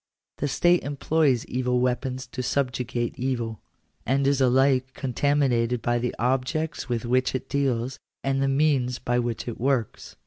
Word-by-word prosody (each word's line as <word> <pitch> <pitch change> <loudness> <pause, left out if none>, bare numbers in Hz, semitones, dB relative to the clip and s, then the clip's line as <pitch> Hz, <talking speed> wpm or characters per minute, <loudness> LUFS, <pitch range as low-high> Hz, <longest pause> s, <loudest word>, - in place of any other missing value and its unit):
The 145 - 0
state 175 +5 +3
employs 145 -2 +1
evil 125 0 0
weapons 125 +1 -1
to 130 +1 -6
subjugate 125 -1 -2
evil, 120 -5 -2 0.4
and 135 +5 +1
is 140 -1 +2
alike 130 0 +3
contaminated 130 -3 +1
by 120 0 +1
the 125 0 -2
objects 130 +4 -1
with 120 -1 -1
which 130 +2 +1
it 130 - -3
deals, 130 -2 -1 0.2
and 135 0 0
the 135 - +2
means 135 -3 +2
by 120 0 0
which 120 -1 -3
it 120 - -5
works. 130 -4 -1
130 Hz, 150 wpm, -25 LUFS, 120-135 Hz, 0.4 s, state